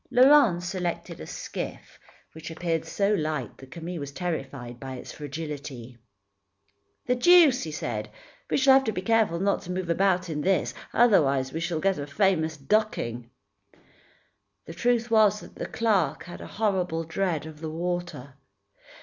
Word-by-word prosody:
Laurent 250 -8 +5
selected 175 -1 -4
a - - -8
skiff, - - -7 0.3
which 160 0 -9
appeared 165 0 -2
so 200 +1 +1
light 155 - -2
that 135 - -13
Camille 170 +2 -6
was 140 -1 -6
terrified 135 -7 -5
by 130 0 -6
its 125 - -9
fragility. 145 -5 -7 1.1
"The 250 - +2
deuce," 310 0 +6 0.2
said 105 -2 -3
he, 105 - -25 0.4
"we - - +1
shall 270 0 +6
have 270 0 +6
to 220 - 0
be 185 -2 -4
careful 220 -5 +2
not 200 +2 +1
to 180 - -7
move 180 -2 -2
about 185 0 +2
in 150 -3 -3
this, 190 +3 +1 0.2
otherwise 140 - +3
we 160 - -2
shall 170 -1 -2
get 195 0 +1
a 145 - -5
famous 160 -2 +1
ducking." 135 - -1 1.4
The 165 - -8
truth 240 +4 0
was 210 -2 +5
that - - -13
the - - -5
clerk 195 -10 +1
had 175 +1 -10
a - - -8
horrible 185 -6 -1
dread 165 -1 -2
of 155 -1 -10
the 160 - -4
water. 175 -5 -4
175 Hz, 160 wpm, -26 LUFS, 150-200 Hz, 1.4 s, deuce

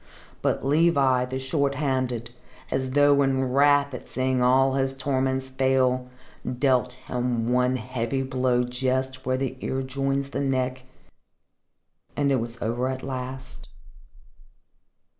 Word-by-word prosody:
But - - 0
Levi, 140 -4 +3
the 130 +1 -4
Short 140 +1 0
handed, 130 -4 -1 0.4
as 130 0 -1
though 145 +1 +4
in 135 -1 +1
wrath 140 +1 +4
at 125 - -7
seeing 130 0 0
all 130 +2 +4
his 135 0 0
torments 130 0 -1
fail, 130 -1 +1 0.5
dealt 130 -2 +2
him 125 -2 -2
one 125 0 +2
heavy 125 +1 -2
blow 130 -1 +1
just 130 +1 -2
where 130 0 +1
the 130 -1 -2
ear 135 0 -2
joins 135 +1 -2
the - - -2
neck, 130 -1 -1 1.3
and 140 -1 +2
it 135 - +3
was 115 +1 -5
over 120 +4 -1
at 130 0 -4
last. 130 0 -7
130 Hz, 130 wpm, -25 LUFS, 125-135 Hz, 1.3 s, though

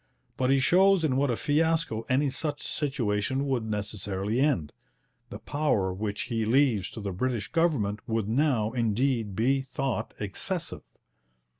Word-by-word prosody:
But 130 0 0
he 135 0 +4
shows 190 +5 +4
in 140 -5 +1
what 140 +1 +2
a 120 - +1
fiasco 155 -5 0
any 135 +2 +2
such 145 +1 -3
situation 130 -2 -1
would 130 -4 0
necessarily 105 0 -3
end. 100 - +1 0.6
The - - -7
powers 100 -11 -1
which 105 -1 -2
he 115 -1 -2
leaves 115 -4 +2
to 110 - -7
the 100 -1 -3
British 115 +3 -2
government 140 -12 +1
would 110 -2 0
now, 115 -3 +1
indeed, 115 -2 0
be 135 +5 +2
thought 135 -1 -3
excessive. 165 - -3
125 Hz, 145 wpm, -28 LUFS, 105-145 Hz, 0.6 s, he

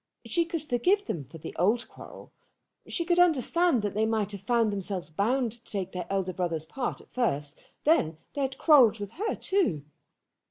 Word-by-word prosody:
She 340 -1 +1
could 330 -2 -4
forgive 360 - +1
them 150 - -4
for 145 +6 -12
the 160 +1 -8
old 215 +8 +2
quarrel. - - -13 0.6
She 340 - -1
could 350 0 +2
understand 335 -4 +3
that 205 - -1
they 220 +1 +1
might 215 -2 0
have 200 -2 -6
found 225 0 +2
themselves 190 -5 -4
bound 235 +8 +1
to 235 +1 -17
take 195 -3 -3
their 180 -1 -5
elder 190 -2 -1
brother's 170 -3 -2
part 250 +9 -4
at - - -22
first. 145 - -1 0.3
Then 165 - +3 0.2
they 285 - -3
had 265 -1 -2
quarrelled 260 -9 +6
with 205 -2 -6
her, 425 +6 -2
too. 350 - 0
220 Hz, 190 wpm, -28 LUFS, 185-285 Hz, 0.6 s, quarrelled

